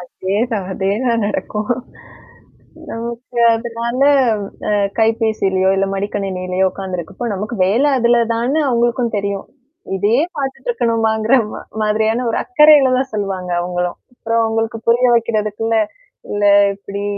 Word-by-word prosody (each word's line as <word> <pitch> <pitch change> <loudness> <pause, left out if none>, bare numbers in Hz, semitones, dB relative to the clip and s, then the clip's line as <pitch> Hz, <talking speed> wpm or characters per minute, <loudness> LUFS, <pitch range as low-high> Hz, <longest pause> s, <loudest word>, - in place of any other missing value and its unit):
அதேதான். 200 +4 -2
அதேதான் 215 +4 0
நடக்கும். 210 +1 -3 1.2
நமக்கு 235 +1 -6 0.2
அதனால 235 +2 -3 0.7
அ - - +1 0.3
கைபேசியிலயோ, 220 -4 +1
இல்ல 195 0 +1
மடிக்கணினியிலயோ 190 -2 -1
உட்கார்ந்துருக்கப்போ, 190 +3 -5
நமக்கு 210 +5 -4
வேலை 235 +10 +2
அதுல 240 0 +3 0.2
தான்னு 245 +6 0
அவங்களுக்கும் 240 -1 0
தெரியும். 200 -1 -3 0.5
இதையே 215 +8 +2 0.2
பாத்துட்டுருக்கணுமாங்கற 230 - 0 0.2
மா - - -7 0.2
மாதிரியான, 220 +3 +1
ஒரு - - -1
அக்கறையில 300 -6 +6
தான் 265 +1 -2
சொல்லுவாங்க 195 -3 -3
அவங்களும். 180 0 -2 0.2
அப்புறம் 230 -1 0
அவங்களுக்கு 225 0 -1
புரிய 240 +2 +4
வைக்கிறதுக்குள்ள, 225 -1 0 0.6
இல்ல 205 0 -1 0.3
இப்படி 200 0 -7
225 Hz, 110 wpm, -17 LUFS, 200-235 Hz, 1.2 s, அக்கறையில